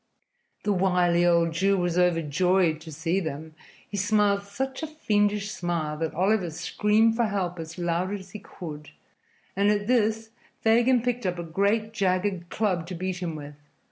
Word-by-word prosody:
The 205 - +1
wily 180 -2 +2
old 170 -1 +3
Jew 195 +4 +2
was 175 -2 0
overjoyed 175 0 +2
to 160 - -10
see 165 +5 -1
them. 160 -2 -5 0.3
He 205 - -5
smiled 205 0 +2
such 260 +8 -5
a 315 - -3
fiendish 210 -8 0
smile 170 -5 -2
that 160 -1 -2
Oliver 190 +1 +2
screamed 210 +7 +2
for 235 0 +2
help 185 -4 -2
as 160 +1 -7
loud 175 +2 -1
as 195 -2 -6
he 210 - -7
could, 155 -6 -9 0.7
and 200 +2 +3
at 205 -1 +1
this 225 -1 +1 0.3
Fagin 235 +2 +4
picked 245 -4 -1
up 180 -1 -2
a 170 - -4
great 200 +6 0
jagged 185 -2 0
club 185 -6 -1
to 185 - -5
beat 185 +1 -3
him 170 -3 -3
with. 145 -1 -8
185 Hz, 170 wpm, -26 LUFS, 170-210 Hz, 0.7 s, Fagin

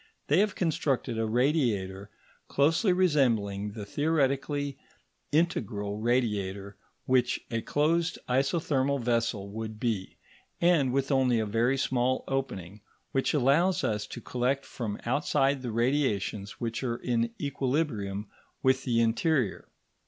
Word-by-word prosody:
They 150 +5 +5
have 205 -1 +2
constructed 135 -8 0
a 110 - 0
radiator 110 -7 0 0.4
closely 165 +8 +3
resembling 115 - +1
the 105 -2 -6
theoretically 145 +1 0 0.5
integral 105 - 0
radiator 105 -5 -1 0.3
which 125 -1 +2
a 115 -1 -1
closed 165 +5 +1
isothermal 140 +1 +1
vessel 115 -4 0
would 110 0 -6
be, 110 -6 -2 0.4
and 170 -7 +3
with 135 +2 0
only 130 -3 +3
a 110 - 0
very 115 +5 +1
small 130 -1 +1
opening, 105 -8 -3 0.3
which 135 +3 +1
allows 150 +7 +3
us 105 -1 -1
to 120 - -8
collect 130 +4 -1
from 110 -5 -5
outside 135 +1 +1
the 125 -2 -4
radiations 115 -5 0
which 115 -2 -3
are 120 -2 -1
in 115 -1 0
equilibrium 125 -8 -1 0.4
with 130 0 +3
the 115 -3 +2
interior. 120 - +1
125 Hz, 125 wpm, -28 LUFS, 110-140 Hz, 0.5 s, They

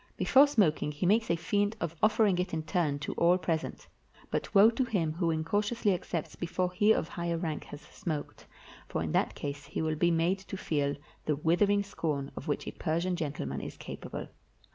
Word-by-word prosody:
Before 280 +2 +6
smoking, 190 - +2
he 150 +5 -3
makes 220 +5 +3
a 170 - +3
feint 205 +5 0
of 170 -1 -3
offering 215 -4 +4
it 180 -2 -1
in 160 - -2
turn 160 -4 0
to - - -3
all 175 +2 +5
present; 165 -3 -3 0.5
but - - -3
woe 205 +3 +8
to 250 +3 0
him 180 -10 0
who 170 0 0
incautiously 205 +7 +1
accepts 170 -2 -4
before 180 +1 -1
he 205 +4 +4
of 165 - +2
higher 170 -1 -2
rank 160 -3 -3
has 145 - -9
smoked, 155 -2 -6 0.4
for - - -2
in - - -3
that - - +1
case 145 0 -5
he - - -4
will 160 -1 0
be 170 +3 +3
made 170 +3 +2
to 195 0 -7
feel 145 -5 0 0.3
the 150 - +1
withering 200 +7 +2
scorn 150 -8 -3
of - - -7
which 145 - -1
a - - -4
Persian 170 +2 -1
gentleman 140 - -3
is - - -7
capable. - - -7
170 Hz, 195 wpm, -30 LUFS, 155-200 Hz, 0.5 s, woe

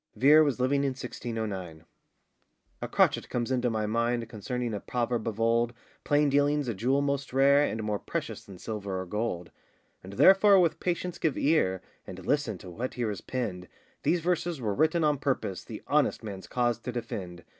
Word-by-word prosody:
Vere 150 +4 +6
was 140 -4 0
living 140 +2 +2
in 135 -1 0
1609.] 105 -10 -5 1.0
A - - -3
CROTCHET - - +2
comes 120 +1 -2
into 125 -1 +1
my 110 -2 -1
mind 115 +2 0
Concerning 120 +1 -4
a 105 - -2
proverb 120 0 -2
of 110 -1 -3
old, 115 +1 +2 0.3
Plain 145 0 +3
dealing's 145 0 +2
a 120 - -1
jewel 130 +8 +1
most 140 -1 -2
rare, 140 +2 +5
And 110 -6 -2
more 105 -1 -1
precious - - -5
than 95 -2 -12
silver 100 -2 -4
or 95 - -4
gold: 90 -3 -3 0.5
And 95 +1 -9
therefore 195 - +6
with 170 -3 +2
patience 180 0 -2
give 155 -4 0
ear, 115 - +2 0.2
And 95 -1 -9
listen 135 -7 0
to 90 +1 -11
what 120 +8 -4
here 120 -3 -1
is 100 - -6
penned, 100 -9 -4 0.3
These 175 0 +1
verses 175 -2 -1
were 110 -5 -1
written 160 - +2
on 150 -2 +2
purpose 130 -10 -2
The - - -9
honest - - +1
man's 95 -4 -7
cause 120 0 0
to 125 - -5
defend. 95 -7 -6
120 Hz, 185 wpm, -28 LUFS, 105-140 Hz, 1.0 s, Vere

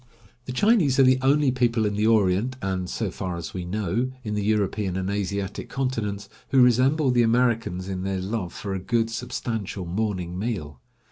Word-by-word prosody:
The 130 - -5
Chinese 160 - +3
are - - +8
the 130 0 +5
only 140 +1 +3
people 120 -3 +1
in 105 - 0
the 105 +2 +1
Orient, 110 +3 +2
and, 95 -3 -2
so 110 -5 -2
far 90 -1 -4
as 85 - -6
we 90 -2 -4
know, 105 +6 -1
in 105 -2 -3
the 105 -1 -1
European 105 -2 0
and 95 +1 -2
Asiatic 100 0 -3
continents, 110 -7 -2 0.2
who 135 - +3
resemble 130 +4 +4
the 120 -1 +3
Americans 115 -6 +1
in 95 -1 -3
their 95 0 -2
love 95 -1 -3
for 100 -2 -5
a 95 - -2
good, 115 +3 0
substantial 115 -5 -4
morning 90 -2 -2
meal. 85 - -4
105 Hz, 185 wpm, -25 LUFS, 95-125 Hz, 0.2 s, are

